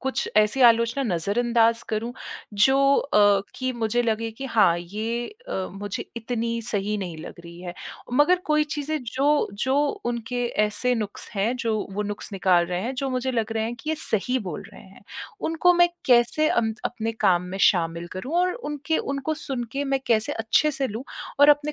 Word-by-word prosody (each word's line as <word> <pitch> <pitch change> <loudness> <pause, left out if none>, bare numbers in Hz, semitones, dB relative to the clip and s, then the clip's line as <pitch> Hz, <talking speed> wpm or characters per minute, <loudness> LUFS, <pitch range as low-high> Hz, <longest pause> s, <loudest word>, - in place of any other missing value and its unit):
कुछ 265 0 -2
ऐसी 215 +5 +3
आलोचना 235 +3 +4
नजरअंदाज 230 +5 +2
करूँ, 225 +2 -2 0.4
जो 265 +7 +4 0.2
अ, 205 -6 +4 0.2
कि 255 0 -2
मुझे 235 0 0
लगे 225 0 -1
कि 270 +5 -7
हाँ, 215 -8 +4
ये 220 +7 -3 0.2
अ, - - -4 0.2
मुझे 205 0 -5
इतनी 230 0 -2
सही 210 -2 -1
नहीं 175 -4 -5
लग - - -8
रही 170 +1 -11
है 175 -1 -6 0.4
मगर 300 +7 +5
कोई 305 0 +3
चीज़ें 300 +1 -2
जो 280 +5 +1 0.2
जो 260 +1 +1 0.3
उनके 240 +1 -2 0.2
ऐसे 230 +4 0
नुक्स 210 -3 -4
हैं 210 +5 +1
जो 230 -3 -1 0.2
वो 210 +2 -2
नुक्स 205 0 -5
निकाल 180 -3 +3
रहे 180 0 -2
हैं 255 +4 -3
जो 270 +1 -1
मुझे 255 +1 -1
लग 225 -1 -1
रहे 220 0 -1
हैं 235 +1 -3
कि 310 - -3
ये - - +1
सही 250 +3 0
बोल 180 -7 -6
रहे - - -13
हैं। 195 +1 -17 0.4
उनको 330 +2 +3
मैं 350 0 +5 0.2
कैसे 250 +5 +4
अम, 220 -2 +1
अपने 225 -1 -4
काम 175 -1 +4
में - - -4
शामिल 170 -1 -1
करूँ 250 - -5
और 365 0 +2
उनके 295 - -2
उनको 275 +3 -2
सुनके 270 -2 -4
मैं 270 -1 0
कैसे 220 -2 +2
अच्छे 225 +7 +2
से 270 -1 -1
लूँ 225 +5 -6 0.4
और 290 - +8
अपने 295 +1 +2
230 Hz, 185 wpm, -24 LUFS, 210-270 Hz, 0.4 s, और